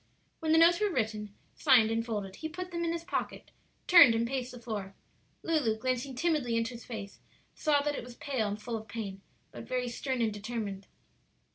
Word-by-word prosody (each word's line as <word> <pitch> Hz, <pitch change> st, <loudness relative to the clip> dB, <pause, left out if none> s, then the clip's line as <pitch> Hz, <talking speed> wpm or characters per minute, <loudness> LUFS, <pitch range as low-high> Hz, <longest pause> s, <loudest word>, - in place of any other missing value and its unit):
When 315 Hz, -1 st, -1 dB
the 320 Hz, -, +6 dB
notes 340 Hz, +1 st, +6 dB
were 420 Hz, -1 st, +2 dB
written, 215 Hz, -, -2 dB, 0.2 s
signed, 245 Hz, -7 st, +5 dB
and 225 Hz, 0 st, 0 dB
folded 205 Hz, -4 st, -4 dB
he 315 Hz, -, -5 dB
put 365 Hz, +3 st, -6 dB
them 340 Hz, 0 st, -2 dB
in 335 Hz, -, 0 dB
his 335 Hz, 0 st, -3 dB
pocket, 360 Hz, -, -4 dB, 0.3 s
turned 335 Hz, -10 st, +8 dB
and 230 Hz, +1 st, +1 dB
paced 255 Hz, 0 st, -3 dB
the 245 Hz, -, -10 dB
floor. 210 Hz, -4 st, -5 dB, 0.5 s
Lulu, 290 Hz, -10 st, +1 dB
glancing 255 Hz, +3 st, -2 dB
timidly 285 Hz, -6 st, +1 dB
into 230 Hz, +2 st, -1 dB
his 235 Hz, -, -9 dB
face, 210 Hz, -4 st, -7 dB, 0.3 s
saw 290 Hz, -2 st, +2 dB
that 295 Hz, 0 st, 0 dB
it -, -, -5 dB
was 245 Hz, 0 st, -11 dB
pale 265 Hz, -7 st, -2 dB
and 205 Hz, +1 st, -3 dB
full 230 Hz, +2 st, -4 dB
of 220 Hz, 0 st, -10 dB
pain, 200 Hz, -3 st, -6 dB, 0.3 s
but 230 Hz, -, -9 dB
very 250 Hz, 0 st, -1 dB
stern 260 Hz, +2 st, -3 dB
and 220 Hz, -2 st, 0 dB
determined. 205 Hz, -2 st, -5 dB
240 Hz, 205 wpm, -30 LUFS, 220-295 Hz, 0.5 s, turned